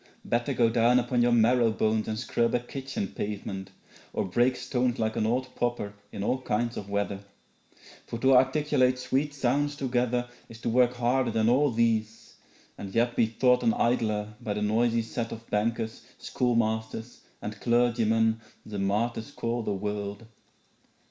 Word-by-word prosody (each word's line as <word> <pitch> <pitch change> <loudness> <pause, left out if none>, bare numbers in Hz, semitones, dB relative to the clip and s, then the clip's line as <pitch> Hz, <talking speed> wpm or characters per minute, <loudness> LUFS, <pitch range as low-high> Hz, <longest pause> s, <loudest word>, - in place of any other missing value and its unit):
Better 120 +3 0
go 120 -2 +3
down 115 +2 +4
upon 120 0 +1
your 120 0 +3
marrow 120 0 +4
bones 110 0 0
And 110 - -2
scrub 115 0 0
a - - +2
kitchen 130 -4 -5
pavement, 100 -2 -5 0.4
or - - -1
break 120 +7 +2
stones 125 -1 -1
Like 110 0 -1
an 110 - +1
old 125 +2 -1
pauper 120 -4 -2 0.2
in 100 - -5
all 130 +5 0
kinds 120 0 -1
of 100 - -6
weather; 100 -1 -1 0.9
For 115 - -4
to 130 +2 +4
articulate 130 -1 +3
sweet 130 +3 -1
sounds 145 +2 0
together 125 -2 0 0.2
Is 115 - -11
to - - -1
work 125 +1 +3
harder 125 +1 +1
than 110 0 +2
all 140 +4 +4
these 110 -2 0 0.5
and 95 -1 -7
yet 120 +1 +2
Be 115 - +3
thought 125 +3 +3
an 230 0 +2
idler 110 - 0
by 110 -3 -2
the 105 0 -2
noisy 115 +2 +2
set 115 +1 -4
Of 115 0 -8
bankers, 110 +1 -1 0.2
schoolmasters, 110 -1 -1 0.2
and 105 0 -7
clergymen 115 -2 +2 0.2
The 105 -2 -5
martyrs 110 +5 -1
call 120 -4 -2
the 110 - -2
world.' 105 +1 -4
115 Hz, 160 wpm, -28 LUFS, 110-125 Hz, 0.9 s, down